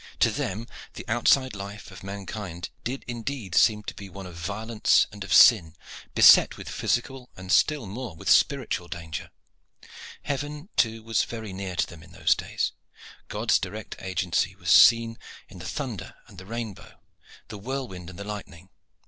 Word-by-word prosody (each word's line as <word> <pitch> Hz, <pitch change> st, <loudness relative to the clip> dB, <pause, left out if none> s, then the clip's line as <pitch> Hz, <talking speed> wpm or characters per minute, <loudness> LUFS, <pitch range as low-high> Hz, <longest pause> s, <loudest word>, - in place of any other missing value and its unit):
To -, -, +5 dB
them 105 Hz, +5 st, -3 dB, 0.3 s
the -, -, -8 dB
outside 125 Hz, +1 st, +3 dB
life 100 Hz, +1 st, -8 dB
of 90 Hz, 0 st, -11 dB
mankind 100 Hz, -3 st, -6 dB
did 130 Hz, +3 st, -4 dB
indeed 120 Hz, -4 st, -5 dB
seem 105 Hz, +2 st, +4 dB
to -, -, -6 dB
be 100 Hz, -1 st, -10 dB
one 95 Hz, +1 st, -9 dB
of 90 Hz, -2 st, -10 dB
violence 105 Hz, +6 st, +1 dB
and 105 Hz, -1 st, -8 dB
of 100 Hz, -, -9 dB
sin, 85 Hz, -9 st, +7 dB, 0.4 s
beset -, -, +7 dB
with -, -, -9 dB
physical 125 Hz, +1 st, -2 dB
and 95 Hz, 0 st, -6 dB
still 150 Hz, -6 st, +3 dB
more 110 Hz, 0 st, -6 dB
with -, -, -10 dB
spiritual 90 Hz, -, +3 dB
danger. 80 Hz, -4 st, -6 dB, 0.9 s
Heaven, 145 Hz, +4 st, -4 dB
too, 115 Hz, -2 st, +1 dB
was 115 Hz, -1 st, +1 dB
very 110 Hz, -4 st, -7 dB
near 95 Hz, -1 st, -5 dB
to -, -, +1 dB
them 85 Hz, -2 st, -13 dB
in 80 Hz, 0 st, -16 dB
those -, -, +3 dB
days. -, -, -2 dB, 0.6 s
God's 110 Hz, +1 st, +1 dB
direct 105 Hz, +3 st, -6 dB
agency 95 Hz, -1 st, -1 dB
was 85 Hz, -3 st, -6 dB
to -, -, +10 dB
be -, -, +11 dB
seen 115 Hz, -1 st, +2 dB, 0.3 s
in 95 Hz, -, -12 dB
the 90 Hz, -, -7 dB
thunder 125 Hz, -, -5 dB
and -, -, -14 dB
the 95 Hz, -, -12 dB
rainbow, 115 Hz, -3 st, -7 dB, 0.5 s
the 105 Hz, -2 st, -7 dB
whirlwind 110 Hz, -7 st, -5 dB
and 90 Hz, -, -11 dB
the 100 Hz, -, -6 dB
lightning. 95 Hz, -4 st, -8 dB
105 Hz, 175 wpm, -26 LUFS, 95-115 Hz, 0.9 s, be